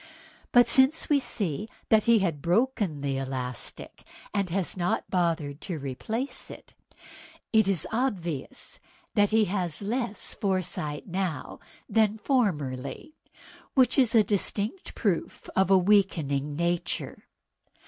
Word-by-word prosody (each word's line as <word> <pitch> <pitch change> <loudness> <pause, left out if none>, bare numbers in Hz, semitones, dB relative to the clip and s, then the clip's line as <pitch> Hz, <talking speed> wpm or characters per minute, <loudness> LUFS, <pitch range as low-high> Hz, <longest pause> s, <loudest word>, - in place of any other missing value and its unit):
But 245 0 +6
since 265 +4 +4
we 290 -2 +5
see 205 - -3 0.3
he 235 -1 +5
had 170 -8 -1
broken 190 - +1
the 140 -1 -1
elastic, 130 -2 -5 0.3
and 200 -3 0
has 185 +1 -1
not 175 -1 0
troubled 165 -5 0
to 180 -5 -4
replace 185 - -4
it, - - -12 0.8
it 220 -3 +5
is 195 -5 +1
obvious 190 - -3 0.3
that 205 -1 +4
he 220 0 +4
has 185 -2 -2
less 230 0 -2
foresight 185 -6 -2
now 180 -7 -3 0.3
than 215 0 +2
formerly, 175 - -1 0.6
which 260 0 +4
is 245 -3 +4
a 220 - +7
distinct 205 - -1
proof 190 -7 -2
of 190 0 +3
a 195 - +7
weakening 165 -8 +2
nature. 170 +2 -2
190 Hz, 120 wpm, -27 LUFS, 155-220 Hz, 0.8 s, a